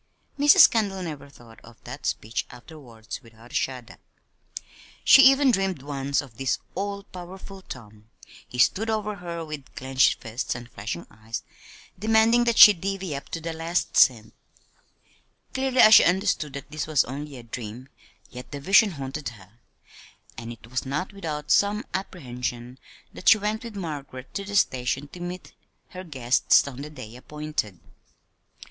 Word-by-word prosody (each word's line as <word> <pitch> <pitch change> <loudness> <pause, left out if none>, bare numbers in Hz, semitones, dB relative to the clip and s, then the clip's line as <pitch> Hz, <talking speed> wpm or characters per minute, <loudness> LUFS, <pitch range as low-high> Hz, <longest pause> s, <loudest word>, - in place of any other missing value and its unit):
Mrs. 290 0 +8
Kendall 200 -4 -1
never 150 -4 -7
thought 120 -4 -17
of 115 0 -15
that - - -7
speech 110 +2 -3
afterward 125 -4 -14
without 115 +1 -17
a - - -14
shudder. 125 -3 -3 1.1
She 270 - +8
even 270 -1 +4
dreamed 190 - -1
once 140 -1 -1
of 130 -6 -15
this 135 -2 0 0.2
all 200 +1 -4
powerful 190 +1 -11
Tom 110 - -12 0.4
he 125 - -9
stood 215 - +2
over 210 -1 -2
her 170 -2 -6
with 150 -3 -9
clinched 130 0 +2
fists 115 +2 -4
and 120 0 -9
flashing 105 -5 -6
eyes, 110 0 -7 0.6
demanding 225 +3 +4
that 235 -1 +1
she 210 - +11
"divvy 190 -3 -4
up" 140 - -8
to - - -4
the 165 0 -5
last 165 +2 -2
cent. 110 -5 +4 1.2
Clearly 260 -1 -1
as 215 - +8
she - - +10
understood 180 -5 +1
that 140 +1 -8
this 155 0 -4
was 155 -4 +3
only 140 +2 -7
a 120 - -11
dream, 115 +2 -8 0.4
yet 125 0 -10
the 145 - -5
vision 195 +6 +4
haunted 140 0 -5
her; 105 0 -17 0.8
and 115 0 -7
it 115 -1 -12
was 130 +2 -3
not 150 +9 -3
without 155 -6 -5
some 205 +3 +2
apprehension 125 -8 -5 0.3
that - - +2
she 225 - +8
went 215 +2 -3
with 230 -3 -8
Margaret 145 -8 -7
to 200 - -3
the 205 +1 -6
station 130 -3 0
to 180 - -12
meet 175 +1 -7 0.4
her 185 0 -8
guests, 130 -5 +2
on 135 -1 -7
the 150 - -7
day 115 -7 -10
appointed. 150 - -5
150 Hz, 160 wpm, -25 LUFS, 125-195 Hz, 1.2 s, she